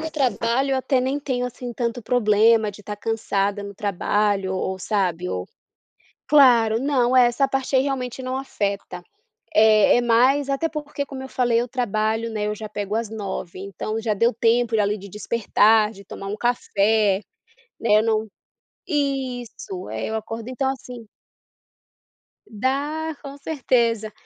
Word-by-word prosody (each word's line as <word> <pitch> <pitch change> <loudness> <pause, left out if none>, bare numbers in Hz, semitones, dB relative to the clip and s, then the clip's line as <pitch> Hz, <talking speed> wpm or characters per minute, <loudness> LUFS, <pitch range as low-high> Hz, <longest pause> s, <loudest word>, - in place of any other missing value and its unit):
do 320 0 -4
trabalho 260 -2 0
eu - - +2
até 260 0 +1
nem 265 +3 -1
tenho, 255 -3 -2
assim, 245 0 -7
tanto 235 0 -3
problema 220 -1 +3
de 205 - -13
estar 210 0 -6
cansada 205 -2 -1
no 200 0 -8
trabalho, 200 0 0
o - - -2 0.2
ou 190 - -7
sabe, 180 -3 -1
ou 90 - -3 0.8
claro, 240 -6 +5
não, 260 -2 +1
é, 250 -1 +7
essa 270 +3 +1
parte 270 0 -1
aí 260 - +4
realmente 260 -2 -3
não 255 +1 -2
afeta, 200 -8 -4 0.5
é 215 -3 +5
é - - +2
mais 255 +4 +3
até 275 +4 0
porque, 295 -2 -5
como 270 -1 -8
eu - - -7
falei, 240 -3 +2
eu 240 - -3
trabalho, 225 -2 -1
né, 210 -1 -2
eu 210 - -2
já 215 0 -7
pego 205 0 -3
às 225 -1 -2
9, 195 -5 -5
então 200 +3 -4
já 220 -1 0
deu 230 +4 +2
tempo, 230 0 +2
ali, 205 0 +1
de 200 0 -11
despertar, 215 +1 +2
de 200 -2 -13
tomar 195 - -8
um 205 +2 -4
café, 215 -4 +1 0.6
né, 215 -2 +4
não 220 0 0 0.6
isso, 260 - -3
é, 110 0 -3
eu 220 - -1
acordo, 225 +1 -6
então 260 +1 -1
assim 250 -3 -8 1.4
Dá, 285 +8 -2
com 280 -1 -8
certeza. 235 -7 0
230 Hz, 160 wpm, -23 LUFS, 210-260 Hz, 1.4 s, é